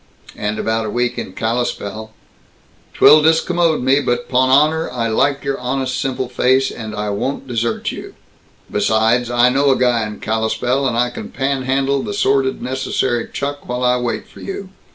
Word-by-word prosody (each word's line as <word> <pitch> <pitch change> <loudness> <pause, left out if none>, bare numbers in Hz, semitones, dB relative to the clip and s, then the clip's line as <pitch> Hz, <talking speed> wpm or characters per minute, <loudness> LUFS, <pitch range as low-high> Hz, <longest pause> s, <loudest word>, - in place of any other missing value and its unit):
"And 105 +1 -3
about 110 0 -1
a - - -3
week 120 +2 -1
in 95 - -6
Kalispell!" 110 -2 -3 0.9
"'Twill 155 - +7
discommode 160 -1 +2
me, 135 +2 +4
but 120 -3 -1
'pon 130 0 +2
honor, 155 +4 +3
I 120 -2 -2
like 140 +5 +1
your 140 -1 -2
honest 130 +1 -2
simple 130 -1 -2
face, 130 +2 +2
and 110 -2 -7
I 105 0 -2
won't 135 +6 -3
desert 115 -2 -1
you. - - -9 0.6
Besides! 110 +4 +2
I 120 +1 +4
know 140 +2 +2
a 135 - +3
guy 120 -3 +2
in 105 - -8
Kalispell, 115 +5 0
and 120 -2 -1
I 125 +1 +1
can - - -7
panhandle 135 0 0
the 205 - -4
sordid 135 -8 +1
necessary 130 -2 -1
chuck 145 -1 -5
while 125 0 -2
I 125 0 +3
wait 120 -1 -3
for - - -16
you. 195 0 -6
125 Hz, 175 wpm, -18 LUFS, 115-135 Hz, 0.9 s, Twill